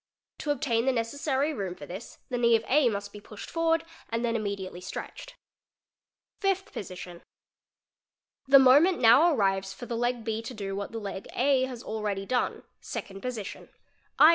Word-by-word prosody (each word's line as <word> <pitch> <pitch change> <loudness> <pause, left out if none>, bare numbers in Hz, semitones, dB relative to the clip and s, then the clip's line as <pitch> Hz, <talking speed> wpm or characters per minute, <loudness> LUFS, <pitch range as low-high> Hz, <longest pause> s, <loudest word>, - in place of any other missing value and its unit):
'To 300 - -4
obtain 255 -4 +1
the - - +5
necessary 270 +5 0
room 195 -7 -4
for 145 - -9
this 190 +8 -9
the 245 - -1
knee 235 -1 +5
of 225 0 0
A 270 -2 +4
must 200 -1 -4
be 210 - -9
pushed 210 0 -10
forward 330 0 +1 0.2
and 230 +1 -1
then 230 -1 0
immediately 200 -4 -3
stretched. - - -7 1.0
Fifth 390 -1 0
Position—The 180 -2 -7 1.4
moment 285 +8 +6
now 270 +9 +7
arrives 195 -6 +1
for 245 - -8
the 235 - -4
leg 240 0 0
B 220 0 -2
to 240 +2 -7
do 195 -2 -4
iia; 200 0 -4
the 225 - -5
leg 200 -2 -6
A 260 0 +3
has 250 -2 -7
already 210 -3 -3
done 250 +3 -1 0.2
(Second 195 0 -6
Position), 240 -6 -5 0.5
2. - - +8
230 Hz, 165 wpm, -28 LUFS, 200-265 Hz, 1.4 s, 2